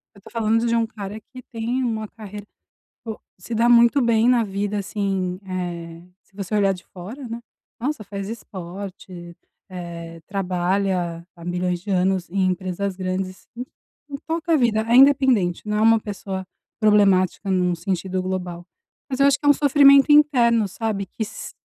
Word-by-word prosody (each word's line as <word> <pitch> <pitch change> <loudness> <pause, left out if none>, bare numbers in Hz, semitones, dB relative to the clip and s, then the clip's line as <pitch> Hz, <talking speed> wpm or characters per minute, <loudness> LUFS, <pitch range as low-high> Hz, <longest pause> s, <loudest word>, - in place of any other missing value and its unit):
Eu - - -15
tô 220 - -14
falando 225 0 +1
de 230 - +1
um 230 -1 +2
cara 210 -1 -7
que 255 +4 -13
tem 235 +3 -2
uma 220 -3 -2
carreira, 210 -2 -10 0.6
pô 220 -2 -6 0.2
se 205 +6 -6
dá 235 +1 +3
muito 235 +3 +6
bem 230 0 +3
na 245 -2 +4
vida, 200 +1 -2
assim, 195 -2 -2
eh, 170 -2 -5 0.2
se 195 - -29
você 195 0 -4
olhar 200 -2 +3
de 180 - -13
fora, 225 +9 -9
né. 230 +1 -5 0.4
Nossa, 270 -3 -3
faz 200 -1 -6
esporte, 185 -4 -8 0.3
eh, 170 -2 -8
trabalha 180 -2 -1
há 170 - -12
milhões 180 0 -2
de 205 - -7
anos 185 -1 +1
em 190 0 +1
empresas 185 +1 -2
grandes, 185 0 -4
e 245 - -4 0.5
e 280 - -4
toca 330 +1 -1
a - - +6
vida, 230 -5 +2
é 235 - +3
independente, 260 -10 +4
não 210 - 0
é - - +1
uma 225 0 +6
pessoa 190 -3 -6 0.3
problemática 200 -2 +3
num 180 -2 +2
sentido 185 +1 -2
global, 180 -2 -4 0.4
mas 260 - -2
eu 275 - +6
acho 275 -1 +3
que 290 - -5
é - - +5
um - - +10
sofrimento 280 0 +6
interno, 240 -8 +4
sabe? 205 -2 -3
Que 220 - -6
s 220 - -8
200 Hz, 175 wpm, -22 LUFS, 185-230 Hz, 0.6 s, um